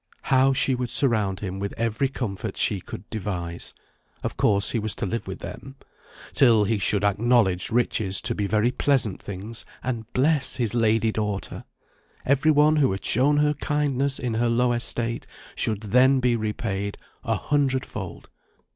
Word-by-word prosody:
How 135 Hz, 0 st, +4 dB
she 135 Hz, 0 st, +1 dB
would 125 Hz, -1 st, -2 dB
surround 110 Hz, -9 st, 0 dB
him 95 Hz, -1 st, -4 dB
with 100 Hz, 0 st, -4 dB
every 115 Hz, +3 st, 0 dB
comfort 110 Hz, -5 st, -4 dB
she 100 Hz, -4 st, 0 dB
could 90 Hz, -, -9 dB
devise 90 Hz, -5 st, -5 dB, 0.5 s
(of -, -, -3 dB
course, 100 Hz, 0 st, +2 dB
he 115 Hz, -, 0 dB
was 110 Hz, -1 st, -2 dB
to -, -, -3 dB
live 115 Hz, +3 st, -3 dB
with 95 Hz, -, -6 dB
them), 135 Hz, 0 st, -8 dB, 0.6 s
till 115 Hz, -5 st, +5 dB
he 105 Hz, +1 st, 0 dB
should 100 Hz, +1 st, +1 dB
acknowledge 100 Hz, -2 st, +2 dB
riches 110 Hz, -5 st, +1 dB
to -, -, 0 dB
be 105 Hz, -, -2 dB
very 110 Hz, +4 st, +2 dB
pleasant 130 Hz, -7 st, 0 dB
things, 105 Hz, +4 st, -6 dB, 0.2 s
and 115 Hz, -2 st, -4 dB
bless 140 Hz, 0 st, +2 dB
his 120 Hz, -5 st, -1 dB
lady 115 Hz, -1 st, +2 dB
daughter! 105 Hz, -2 st, -3 dB, 0.6 s
Every 140 Hz, +3 st, +3 dB
one 155 Hz, +1 st, +5 dB
who 140 Hz, -8 st, +3 dB
had 95 Hz, -, -6 dB
shown 140 Hz, +6 st, +3 dB
her 150 Hz, 0 st, +3 dB
kindness 140 Hz, -2 st, -1 dB
in 125 Hz, -3 st, -3 dB
her 120 Hz, +1 st, +1 dB
low 120 Hz, +1 st, +2 dB
estate 120 Hz, 0 st, -2 dB, 0.3 s
should 110 Hz, -2 st, -1 dB
then 125 Hz, +5 st, +4 dB
be 125 Hz, -2 st, +2 dB
repaid 105 Hz, -2 st, -3 dB, 0.3 s
a -, -, 0 dB
hundred 135 Hz, -3 st, 0 dB
fold. 95 Hz, -6 st, -8 dB
115 Hz, 165 wpm, -24 LUFS, 100-130 Hz, 0.6 s, till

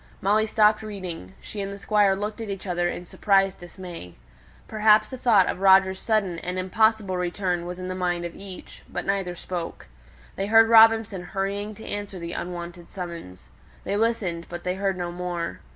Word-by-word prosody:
Molly 215 Hz, +3 st, +2 dB
stopped 215 Hz, -1 st, +4 dB
reading; 185 Hz, -, -7 dB
she 210 Hz, -, -7 dB
and 195 Hz, 0 st, -4 dB
the 200 Hz, -, -7 dB
Squire 205 Hz, -1 st, +3 dB
looked 210 Hz, +3 st, -4 dB
at 220 Hz, -, -5 dB
each 195 Hz, -1 st, -5 dB
other 175 Hz, -1 st, 0 dB
in 175 Hz, -, -6 dB
surprised 195 Hz, +1 st, +2 dB
dismay. 175 Hz, -, -10 dB, 0.5 s
Perhaps 215 Hz, +1 st, +4 dB
a -, -, -4 dB
thought 215 Hz, -7 st, +5 dB
of -, -, -2 dB
Roger's 190 Hz, -1 st, +5 dB
sudden 200 Hz, -6 st, 0 dB
(and 180 Hz, +2 st, -4 dB
impossible) 200 Hz, +1 st, +1 dB
return 180 Hz, -1 st, -2 dB
was 180 Hz, 0 st, -5 dB
in 185 Hz, 0 st, -6 dB
the 185 Hz, -, -3 dB
mind 175 Hz, -1 st, -1 dB
of 170 Hz, -, -6 dB
each; 195 Hz, -2 st, -10 dB
but -, -, -4 dB
neither 195 Hz, -2 st, -1 dB
spoke. 175 Hz, -1 st, -6 dB, 0.5 s
They 195 Hz, -, -1 dB
heard 225 Hz, +1 st, +6 dB
Robinson 225 Hz, -4 st, +6 dB
hurrying 200 Hz, +2 st, -3 dB
to 220 Hz, -, -11 dB
answer 205 Hz, -2 st, -5 dB
the 170 Hz, -1 st, -6 dB
unwonted 175 Hz, 0 st, -6 dB
summons. 170 Hz, -, -8 dB, 0.3 s
They 200 Hz, -, -2 dB
listened; 205 Hz, -6 st, -1 dB
but 175 Hz, 0 st, -7 dB
they 180 Hz, -, -1 dB
heard 195 Hz, 0 st, -1 dB
no 175 Hz, -1 st, -3 dB
more. 175 Hz, -1 st, -4 dB
190 Hz, 185 wpm, -25 LUFS, 175-210 Hz, 0.5 s, heard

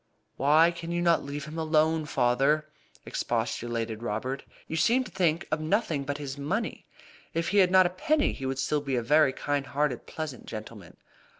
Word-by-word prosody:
"Why 155 Hz, +5 st, +5 dB
can 170 Hz, 0 st, -7 dB
you 175 Hz, -, 0 dB
not 170 Hz, -1 st, +3 dB
leave 140 Hz, +1 st, -5 dB
him 155 Hz, +2 st, -6 dB
alone, 160 Hz, 0 st, +2 dB
father?" 135 Hz, +5 st, +2 dB, 0.4 s
expostulated 115 Hz, -2 st, -2 dB
Robert. 120 Hz, +4 st, -3 dB, 0.2 s
"You -, -, -4 dB
seem 235 Hz, +11 st, +3 dB
to 210 Hz, -, -11 dB
think 170 Hz, -2 st, +1 dB
of 155 Hz, 0 st, 0 dB
nothing 155 Hz, -4 st, 0 dB
but 145 Hz, 0 st, -3 dB
his 140 Hz, -1 st, -6 dB
money. 200 Hz, +11 st, -3 dB, 0.5 s
If 165 Hz, 0 st, 0 dB
he 205 Hz, -, +3 dB
had 185 Hz, -2 st, +5 dB
not 185 Hz, 0 st, +6 dB
a -, -, +2 dB
penny 300 Hz, -, +1 dB
he 135 Hz, -, -5 dB
would 135 Hz, 0 st, -2 dB
still 145 Hz, +2 st, 0 dB
be 135 Hz, -2 st, -2 dB
a 120 Hz, -, 0 dB
very 150 Hz, +3 st, +4 dB
kind 140 Hz, +1 st, -2 dB
hearted, 140 Hz, -3 st, -1 dB
pleasant 155 Hz, -6 st, -6 dB
gentleman." 110 Hz, -4 st, -9 dB
150 Hz, 185 wpm, -28 LUFS, 135-170 Hz, 0.5 s, not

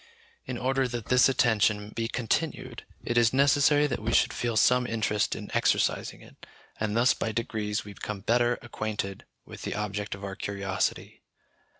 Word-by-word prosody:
In 125 Hz, -, -4 dB
order 130 Hz, +1 st, 0 dB
that 120 Hz, -3 st, -6 dB
this 125 Hz, +1 st, +5 dB
attention 105 Hz, -5 st, +2 dB
be 115 Hz, +1 st, -3 dB
continued, 125 Hz, +1 st, -2 dB, 0.2 s
it 120 Hz, 0 st, +1 dB
is 120 Hz, 0 st, +3 dB
necessary 145 Hz, +2 st, +4 dB
that 140 Hz, -, -2 dB
we 110 Hz, +2 st, -2 dB
should -, -, +3 dB
feel 120 Hz, -2 st, -2 dB
some 125 Hz, +2 st, +4 dB
interest 105 Hz, -2 st, 0 dB
in -, -, -8 dB
exercising -, -, 0 dB
it, -, -, -19 dB, 0.4 s
and 105 Hz, 0 st, -1 dB
thus 120 Hz, +2 st, +4 dB
by 110 Hz, -, -3 dB
degrees 110 Hz, -2 st, -3 dB
we 100 Hz, -, -9 dB
become 105 Hz, 0 st, -6 dB
better 120 Hz, +2 st, +2 dB
acquainted 110 Hz, -4 st, -4 dB, 0.2 s
with -, -, -11 dB
the -, -, -4 dB
object 105 Hz, -1 st, -3 dB
of 100 Hz, -, -12 dB
our 100 Hz, -1 st, -5 dB
curiosity. 100 Hz, -2 st, -3 dB
115 Hz, 170 wpm, -27 LUFS, 105-125 Hz, 0.4 s, this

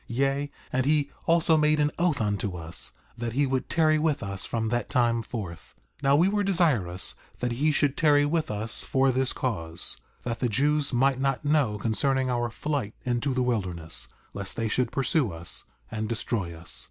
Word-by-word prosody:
Yea, 135 Hz, +3 st, 0 dB, 0.2 s
and 130 Hz, +1 st, +1 dB
he 145 Hz, -2 st, +2 dB, 0.2 s
also 165 Hz, 0 st, +5 dB
made 150 Hz, 0 st, +3 dB
an 150 Hz, 0 st, +2 dB
oath 170 Hz, -5 st, +2 dB
unto 100 Hz, -3 st, -1 dB
us 80 Hz, 0 st, -2 dB, 0.2 s
that 115 Hz, -1 st, -4 dB
he 140 Hz, +3 st, +2 dB
would 130 Hz, -1 st, -1 dB
tarry 155 Hz, -2 st, +3 dB
with 155 Hz, -5 st, 0 dB
us 100 Hz, -1 st, -3 dB
from 110 Hz, -1 st, -1 dB
that 120 Hz, +1 st, -1 dB
time 120 Hz, -3 st, +2 dB
forth. 100 Hz, -8 st, -7 dB, 0.3 s
4:36 -, -, -18 dB
Now 140 Hz, +1 st, +5 dB
we 170 Hz, +5 st, +5 dB
were 205 Hz, +1 st, +1 dB
desirous 150 Hz, -, +2 dB, 0.2 s
that 125 Hz, 0 st, -2 dB
he 145 Hz, +6 st, +2 dB
should 145 Hz, -1 st, +1 dB
tarry 145 Hz, -2 st, +4 dB
with 160 Hz, +1 st, 0 dB
us 110 Hz, +2 st, -1 dB
for 135 Hz, 0 st, +2 dB
this 130 Hz, +1 st, +1 dB
cause, 85 Hz, -10 st, -2 dB, 0.3 s
that 115 Hz, -1 st, -3 dB
the 125 Hz, -, +1 dB
Jews 145 Hz, +5 st, +2 dB
might 130 Hz, +1 st, +2 dB
not 135 Hz, +1 st, 0 dB
know 145 Hz, -8 st, +2 dB
concerning 130 Hz, +5 st, +1 dB
our 120 Hz, -1 st, 0 dB
flight 130 Hz, -3 st, -3 dB
into 125 Hz, +2 st, 0 dB
the 130 Hz, -, +2 dB
wilderness, 90 Hz, -9 st, -1 dB, 0.3 s
lest 100 Hz, -1 st, -4 dB
they 115 Hz, -1 st, -1 dB
should 120 Hz, +2 st, 0 dB
pursue 135 Hz, -, +1 dB
us 85 Hz, +1 st, -4 dB, 0.3 s
and 110 Hz, -1 st, -3 dB
destroy 110 Hz, -5 st, -2 dB
us. 80 Hz, +1 st, -3 dB
125 Hz, 190 wpm, -27 LUFS, 110-145 Hz, 0.3 s, also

